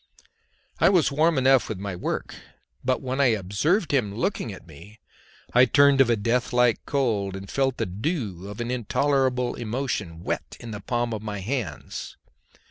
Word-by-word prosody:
I -, -, +6 dB
was 180 Hz, -7 st, +3 dB
warm 155 Hz, +2 st, +2 dB
enough 130 Hz, -1 st, +4 dB
with 110 Hz, -, -3 dB
my 100 Hz, -1 st, -5 dB
work, 90 Hz, -, -3 dB, 0.5 s
but 130 Hz, +1 st, 0 dB
when 130 Hz, +2 st, -1 dB
I 140 Hz, -, +5 dB
observed 145 Hz, -, 0 dB
him 110 Hz, -8 st, +1 dB
looking 175 Hz, -, -2 dB
at 95 Hz, -, -11 dB
me 85 Hz, +7 st, -14 dB, 0.5 s
I 125 Hz, +1 st, +7 dB
turned 140 Hz, +2 st, +5 dB
of 130 Hz, -, +4 dB
a 120 Hz, -, +4 dB
death 115 Hz, +3 st, 0 dB
like 125 Hz, -2 st, +3 dB
cold, 110 Hz, -9 st, 0 dB
and 95 Hz, 0 st, -7 dB
felt 135 Hz, +3 st, 0 dB
the -, -, 0 dB
dew 100 Hz, -, -3 dB
of 105 Hz, +2 st, -8 dB
an 120 Hz, +1 st, -2 dB
intolerable 125 Hz, +1 st, +1 dB
emotion 110 Hz, -8 st, -3 dB
wet -, -, -4 dB
in 120 Hz, -, -8 dB
the 105 Hz, -2 st, -6 dB
palms 120 Hz, +1 st, -1 dB
of 110 Hz, -, -4 dB
my 105 Hz, -1 st, -5 dB
hands. 105 Hz, -, -4 dB
120 Hz, 175 wpm, -25 LUFS, 100-135 Hz, 0.5 s, I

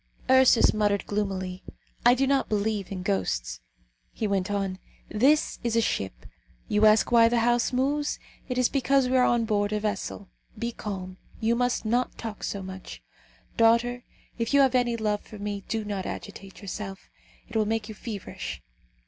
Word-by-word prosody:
Ursus 260 Hz, -2 st, +6 dB
muttered 205 Hz, -1 st, +1 dB
gloomily: 190 Hz, -3 st, -3 dB, 0.4 s
"I 240 Hz, +1 st, +6 dB
do 270 Hz, +2 st, +2 dB
not 275 Hz, 0 st, +1 dB
believe 210 Hz, -2 st, -1 dB
in 185 Hz, -2 st, -4 dB
ghosts." 60 Hz, -, -1 dB, 0.5 s
He -, -, -3 dB
went 195 Hz, -2 st, 0 dB
on, 195 Hz, -2 st, -2 dB, 0.3 s
"This 270 Hz, +9 st, +2 dB
is 235 Hz, -1 st, 0 dB
a -, -, +5 dB
ship. 95 Hz, -, -2 dB, 0.4 s
You 210 Hz, +1 st, +4 dB
ask 215 Hz, +2 st, +4 dB
why 230 Hz, -1 st, +6 dB
the 235 Hz, 0 st, +2 dB
house 240 Hz, 0 st, +2 dB
moves; 285 Hz, +3 st, 0 dB, 0.3 s
it 250 Hz, -, -2 dB
is 250 Hz, -1 st, +4 dB
because 275 Hz, -1 st, +2 dB
we 255 Hz, -, +1 dB
are 255 Hz, -, +5 dB
on 240 Hz, -2 st, +2 dB
board 205 Hz, -2 st, 0 dB
a 210 Hz, -, 0 dB
vessel. 205 Hz, -1 st, -3 dB, 0.3 s
Be 235 Hz, +2 st, -2 dB
calm; 185 Hz, -4 st, -6 dB, 0.2 s
you 225 Hz, +1 st, +2 dB
must 245 Hz, -1 st, 0 dB
not 240 Hz, +3 st, 0 dB
talk 220 Hz, -3 st, -6 dB
so 200 Hz, -1 st, -3 dB
much. 190 Hz, 0 st, -9 dB, 0.5 s
Daughter, 235 Hz, +2 st, +3 dB, 0.4 s
if 230 Hz, +4 st, 0 dB
you 280 Hz, -, +7 dB
have 265 Hz, -2 st, +4 dB
any 245 Hz, -2 st, +2 dB
love 210 Hz, -2 st, -1 dB
for 215 Hz, -, -12 dB
me, 205 Hz, -1 st, -4 dB
do 220 Hz, -2 st, -2 dB
not 200 Hz, -2 st, -3 dB
agitate 195 Hz, +2 st, -8 dB
yourself, 195 Hz, 0 st, -6 dB, 0.4 s
it -, -, -12 dB
will 215 Hz, -1 st, +2 dB
make 220 Hz, -1 st, -1 dB
you 220 Hz, -, -7 dB
feverish. 210 Hz, -2 st, -6 dB
215 Hz, 175 wpm, -27 LUFS, 200-240 Hz, 0.5 s, you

